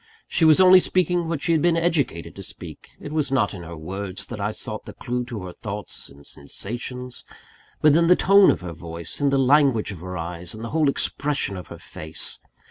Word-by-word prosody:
She 165 - +2
was 155 +1 +6
only 185 0 +9
speaking 180 -2 +1
what 160 -3 -3
she - - +1
had 160 -2 +3
been 170 0 +3
educated 160 - 0
to - - -8
speak; - - -9
it 145 - -8
was 150 -3 0
not 135 -7 +2
in 95 - -7
her 85 0 -8
words 95 +4 -6
that 110 - -7
I 100 +1 0
sought 110 - -5
the - - -9
clue 125 0 -3
to 115 -5 -6
her 90 -1 -7
thoughts 105 0 -6
and 70 0 -16
sensations; 120 - -6 0.6
but 150 -1 +6
in 170 0 +4
the 180 - +7
tone 195 +2 +6
of - - +1
her 90 -2 -6
voice, 85 - -7
in 140 - +3
the 135 - +2
language 135 -5 +3
of 95 - -8
her 90 +1 -6
eyes, 85 +3 -6
in 110 - -8
the 115 - -4
whole 155 -2 +3
expression 140 -5 -1
of 90 -2 -8
her - - -9
face. 80 +1 -6
125 Hz, 220 wpm, -23 LUFS, -, 0.6 s, only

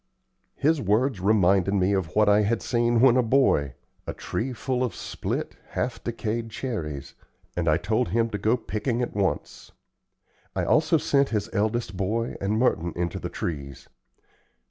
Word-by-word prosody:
His 155 0 +2
words 110 +3 +1
reminded 95 -1 +3
me 95 +1 +2
of 90 -5 -2
what 105 0 +4
I 105 +1 +5
had 110 +2 0
seen 120 -1 +2
when 130 -1 +6
a - - +5
boy 110 - +2 0.3
a - - -3
tree 130 +4 -3
full 125 +1 -2
of 125 - -2
split, - - -4 0.2
half 120 -2 -2
decayed 115 0 -3
cherries 75 - -5 0.4
and 85 -2 +1
I 75 - +4
told 110 +7 0
him 115 +6 +1
to 105 - -3
go 110 +3 +2
to 120 - -10
picking 115 +3 -1
at - - -4
once. 95 -7 -2 0.8
I - - 0
also - - +3
sent 140 0 +2
his 105 -3 -2
eldest 110 -1 -1
boy 110 +5 -1
and 100 +2 0
Merton 85 -8 +1
into 85 -1 -2
the - - -5
trees. 70 -5 -5
110 Hz, 165 wpm, -25 LUFS, 95-120 Hz, 0.8 s, when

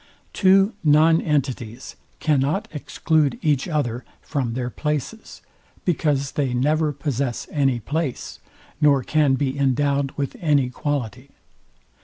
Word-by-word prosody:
Two 195 +2 +4
non 160 +2 +5
entities 130 -5 -2 0.2
cannot 150 +5 +1
exclude 155 -1 0
each 145 -4 +1
other 130 -7 -2 0.2
from 130 -6 -3
their 125 -1 -3
places; 150 - -4 0.4
because 145 -5 0
they 135 -4 -1
never 150 +4 +1
possess 140 -3 -3
any 135 -5 +1
place, 145 +2 -4 0.4
nor 140 -3 +4
can 150 -2 +2
be 135 -1 -1
endowed 140 +1 +1
with 140 -2 -3
any 145 -6 +2
quality. 130 -2 -3
140 Hz, 115 wpm, -22 LUFS, 130-155 Hz, 0.4 s, non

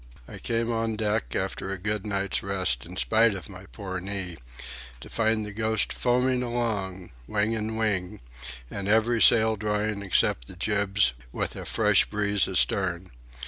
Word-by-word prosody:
I - - -9
came 115 0 -1
on 115 -1 -1
deck, 110 0 -1
after 95 0 -3
a 95 - -2
good 105 +2 -2
night's 100 -1 -1
rest 90 -10 0
in 90 +1 -8
spite 110 +1 +3
of 90 -8 -7
my - - -12
poor 95 +8 -6
knee, 95 -2 -3 0.6
to - - -12
find 110 -1 +1
the 105 - -7
Ghost 110 0 +1
foaming 125 +1 +1
along, 105 -7 -3 0.2
wing 105 +1 0
and 110 0 -3
wing, 100 -5 0 0.5
and 100 0 -4
every 110 +2 +3
sail 110 -1 +6
drawing 105 0 -1
except 75 -10 +1
the - - -9
jibs, 100 - +2 0.2
with - - -3
a - - -7
fresh - - +3
breeze 105 -3 +1
astern. 90 -2 +1
105 Hz, 160 wpm, -26 LUFS, 95-110 Hz, 0.6 s, sail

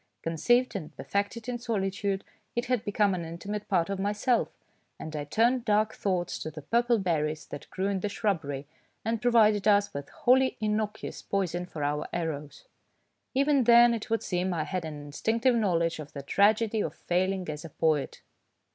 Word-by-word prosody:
Conceived 240 +11 +2
and 160 -5 -6
per - - -6
fected 205 +4 -2
in 245 -1 -3
solitude, 200 -4 -1 0.3
it 240 +1 0
had 250 -3 0
become 205 -1 +2
an 180 - -2
inti 165 +2 -8
mate 210 0 -4
part 175 -4 +2
of 195 -1 -3
myself, 210 +5 +1 0.5
and 155 0 -7
I 145 -1 -3
turned 235 - +2
dark 215 -1 +2
thoughts 180 -3 -1
to - - -4
the 155 -1 -9
purple 235 +6 +2
berries 155 -5 -1
that 145 - -9
grew 190 - -3
in 200 -1 0
the 210 - -2
shrubbery, 160 -10 -2 0.4
and 225 0 -1
provided 215 -4 +4
us 205 -1 +4
with 140 0 -6
wholly 260 +1 +3
innocuous 215 0 -2
poison 180 -3 -2
for 155 -4 -5
our 150 +1 -1
arrows. 150 -4 -4 0.7
Even 280 -1 +3
then, 235 0 +7
it 225 -1 -4
would 225 0 0
seem, 180 0 -1
I 155 - 0
had 180 +2 -3
an 150 -2 -6
instinctive 225 - +1
knowledge 170 -8 +1
of 150 -1 -9
the 140 - -6
tragedy 215 +6 +3
of - - -3
failing 185 +1 -1
as 150 -1 -5
a 165 - -8
poet. 155 -2 0
200 Hz, 180 wpm, -28 LUFS, 165-225 Hz, 0.7 s, then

